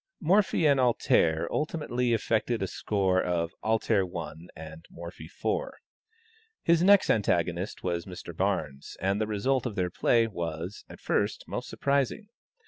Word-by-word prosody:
Morphy 180 0 +3
and 140 -2 +4
"Alter" 85 -9 +2
ultimately 150 -6 -1
effected 115 0 0
a - - -1
score 95 -2 0
of 85 -1 -1
"Alter" 110 -2 +2
1, 85 -2 -7
and 80 0 -10
Morphy 85 -2 -9
4. 455 - -3 0.9
His 170 0 +4
next 200 +2 +6
antagonist 90 -2 0
was 85 -1 -2
Mr. 90 -2 -8
Barnes, 80 -8 -2
and 100 +3 0
the 110 - 0
result 125 +5 0
of 110 - -6
their 90 -3 -1
play 115 +5 +3
was, 85 -2 -5
at - - -11
first, - - -1
most - - -5
surprising. 140 - -1
100 Hz, 140 wpm, -28 LUFS, 85-125 Hz, 0.9 s, next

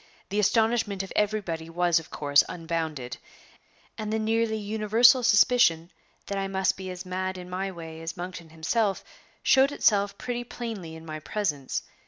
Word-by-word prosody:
The 205 +2 -1
astonishment 220 -2 +2
of 190 - -8
everybody 195 -6 -1
was 175 0 +2
of 160 - -13
course 145 -1 +3
unbounded, 160 -7 -4 0.8
and 215 -1 -3
the 220 - +1
nearly 220 0 +1
universal 220 +4 +4
suspicion 210 -7 +4 0.3
that 200 0 -3
I 195 - -1
must 190 -1 +1
be 190 -1 -7
as 180 +1 -7
mad 185 +1 -3
in 180 0 -9
my 190 +2 -2
way 165 -2 -9
as 165 +2 -6
Monkton 175 -2 -7
himself 195 +6 0 0.4
showed 270 +1 +5
itself 200 -7 +2
pretty 245 -1 -3
plainly 220 -9 -6
in 160 0 -11
my 155 -1 -6
presence. 155 -8 -2
190 Hz, 160 wpm, -27 LUFS, 165-220 Hz, 0.8 s, showed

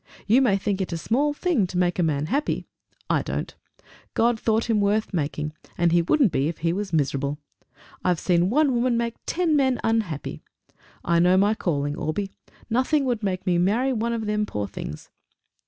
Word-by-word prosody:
You 230 +6 +4
may 220 -7 +3
think 195 0 -1
it 185 - -3
a 170 - -2
small 270 - +1
thing 290 - +1
to 180 - -5
make 180 0 +1
a - - +4
man 150 -3 0
happy! 285 - -1 0.4
I - - +2
don't. - - -4 0.6
God 235 0 +2
thought 225 +1 +1
him 220 -3 +2
worth 210 +1 +1
making, 150 -2 -2 0.2
and 170 -1 +3
he 170 0 +4
wouldn't 235 - +3
be 135 0 +1
if 165 - -3
he 165 - +2
was 200 +1 -3
miserable. 140 -2 0 0.7
I've 180 -3 +1
seen 175 0 +2
one 285 +3 +3
woman 240 0 +1
make 235 -1 -1
ten 335 -3 +1
men 265 -3 +2
unhappy! 215 -10 -1 0.6
I 170 0 +3
know 180 +2 +5
my 205 +3 +4
calling, 145 -8 -1
Orbie. 195 +7 -3 0.4
Nothing 260 +5 +1
would 240 -4 -1
make 190 -2 -2
me 175 -2 +2
marry 230 +9 +2
one 235 0 -1
of 230 -2 -2
them, 210 0 0
poor 105 - -3
things!" 85 -6 -8
200 Hz, 190 wpm, -24 LUFS, 170-235 Hz, 0.7 s, know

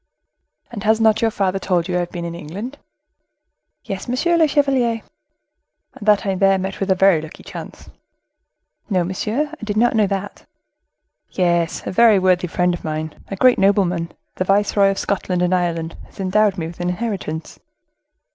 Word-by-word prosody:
"And 215 -4 -6
has 220 +1 +3
not 220 0 +3
your 225 - +3
father 195 -2 -1
told 175 -3 0
you 180 - -2
I - - +2
have 175 -1 -2
been 170 -1 -5
in 170 - -5
England?" 200 - -7 1.0
"Yes, 195 -1 -6
monsieur 300 +8 +1
le 325 -2 +4
chevalier." 265 -6 +1 0.9
"And 210 - -10
that 210 -1 +4
I 195 - +1
there 195 +1 +3
met 190 +1 -4
with 195 - -2
a 190 - +4
very 185 -4 +4
lucky 160 0 -11
chance?" - - -9 1.0
"No, 185 -4 +2
monsieur, 220 - -2
I 320 - -11
did 210 -1 -3
not 240 +2 +3
know 215 -2 +3
that." 195 +1 -5 0.8
"Yes, 170 -2 0
a - - -3
very 220 +1 +5
worthy 185 -1 +2
friend 180 +1 +1
of 175 - -6
mine, 155 0 -4
a 195 - -5
great 250 +5 +4
nobleman, 185 -4 +2 0.3
the - - +1
viceroy 200 +1 +3
of 195 - -1
Scotland 185 -2 -1
and 180 +1 +1
Ireland, 170 -2 -1
has - - -21
endowed 200 +1 +2
me 165 - -3
with 165 +1 -9
an 175 0 -1
inheritance." 180 -6 -4
195 Hz, 180 wpm, -20 LUFS, 175-215 Hz, 1.0 s, very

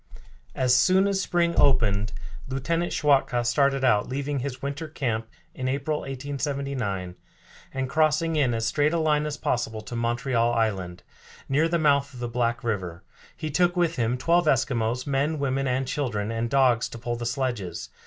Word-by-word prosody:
As 125 -1 +3
soon 185 +9 +4
as 195 -1 0
spring 170 -2 +1
opened 110 -5 +3 0.4
Lieutenant 165 +6 -1
Schwatka 135 -5 +2
started 135 +2 +2
out, 105 -5 +3
leaving 140 +1 -2
his 130 0 -4
winter 140 +4 -4
camp 115 -7 -2 0.3
in 130 - -4
April, 140 +3 -1
1879, 135 - -3 0.6
and 135 0 -2
crossing 155 +3 +2
in 130 -6 +2
as 115 0 -1
straight 145 +7 +1
a - - +2
line 150 -2 +1
as 145 -1 -4
possible 115 -5 -2
to 110 +3 -8
Montreal 120 0 0
Island, 95 -6 -1 0.4
near 150 +4 +2
the 170 +1 +1
mouth 140 -3 +2
of - - -9
the 120 - -3
Black 120 0 -1
River. 95 -7 -3 0.3
He 155 -1 -4
took 175 +4 +2
with 170 -2 +1
him 120 +1 0
twelve 170 +6 +2
Eskimos, 125 -3 +1
men, 145 +3 0
women, 135 -1 -1
and 130 +1 0
children, 115 -7 -2
and 115 +1 -2
dogs 130 -3 +3
to - - -8
pull 120 +1 -3
the 120 0 -4
sledges. 120 -9 -3
130 Hz, 170 wpm, -25 LUFS, 115-145 Hz, 0.6 s, soon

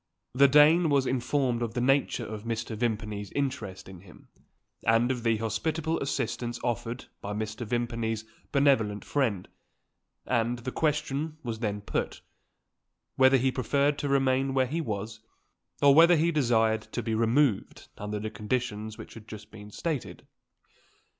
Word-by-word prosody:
The 140 +2 +6
Dane 155 +4 +6
was 140 -2 +3
informed 130 -1 0
of 115 -1 -3
the - - 0
nature 130 -1 +1
of 105 -1 -7
Mr. 115 0 -3
Vimpany's 105 -3 -3
interest 115 -9 -3
in 95 -2 -11
him, 85 -2 -17 0.5
and 115 +3 +3
of 125 -2 -3
the 115 -1 +2
hospitable 155 +9 -1
assistance 120 -3 -3
offered 120 +1 -3 0.2
by 100 - -4
Mr. 110 +2 -4
Vimpany's 115 -2 -2 0.3
benevolent 130 -8 +2
friend; 115 -10 -1 0.8
and 120 0 0
the 120 +2 -5
question 150 0 -1
was 115 -3 -4
then 105 -3 -2
put, - - -3 0.9
whether 130 0 +6
he 130 +1 +1
preferred 140 +3 +1
to 145 - -2
remain 135 0 +2
where 130 -1 +3
he 155 +6 -2
was, 110 -4 -4 0.6
or 140 -1 +8
whether 170 +4 +7
he 165 +2 +2
desired 115 -7 +2
to 120 - -2
be 115 0 -2
removed 115 0 +1
under 105 0 -4
the 110 +1 -4
conditions 110 0 -3
which - - -10
had 110 -2 -12
just 105 -1 -10
been 105 -1 -11
stated? 150 +5 -4
120 Hz, 150 wpm, -28 LUFS, 110-140 Hz, 0.9 s, or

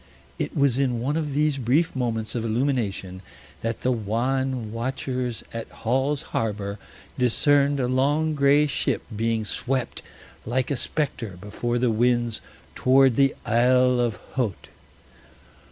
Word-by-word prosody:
It - - -3
was 140 -3 +3
in 125 -4 +1
one 135 +5 -1
of 150 -4 -2
these 150 -1 +2
brief 140 +8 +1
moments 115 -4 -2
of 120 - -2
illumination 110 -6 -1 0.4
that 115 0 -3
the 130 - +1
wan 120 +2 -1
watchers 125 0 -3
at 115 -1 -5
Hall's 135 +5 -1
Harbor 100 -2 -2 0.4
discerned 140 +3 +3
a 125 - +1
long 145 +5 +1
gray 145 +1 +4
ship 140 - -1
being 115 0 0
swept 130 +3 -2 0.4
like 130 +3 -1
a - - +1
specter 125 - -3
before 120 +4 -2
the 120 -1 +2
winds 120 0 +1 0.3
towards 130 -1 +4
the 135 0 +3
Isle 125 +2 +4
of 120 -3 +1 0.2
Haut. 120 -8 -3
125 Hz, 135 wpm, -24 LUFS, 115-135 Hz, 0.4 s, gray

